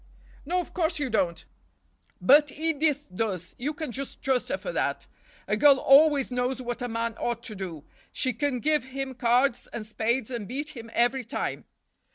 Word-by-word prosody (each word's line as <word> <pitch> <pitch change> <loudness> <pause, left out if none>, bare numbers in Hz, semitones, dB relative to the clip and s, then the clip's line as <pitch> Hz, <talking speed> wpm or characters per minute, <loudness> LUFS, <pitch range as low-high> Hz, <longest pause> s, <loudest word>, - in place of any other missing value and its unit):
"No, 360 +3 +1
of 355 - -6
course 330 -2 0
you 285 -4 -2
don't—but 225 - 0
Edith 305 -2 0
does—you 205 - -3
can 310 -6 -4
just 275 +3 -6
trust 260 -2 +1
her - - 0
for - - -5
that. - - -1 0.4
A 210 - +1
girl 280 +5 +6
always 280 0 +5
knows 250 +1 -1
what 245 -1 -4
a 245 - -1
man 230 0 -2
ought 235 -1 -2
to 220 -3 -6
do—she 190 - -5
can 250 +1 -1
give 305 -1 +2
him 265 0 -5
cards 245 +1 +2
and 225 -2 -5
spades 225 +3 -1
and 230 -5 -4
beat 285 +5 -4
him 235 -6 -9
every 245 +2 +2
time." 235 - -4
255 Hz, 170 wpm, -27 LUFS, 230-290 Hz, 0.4 s, girl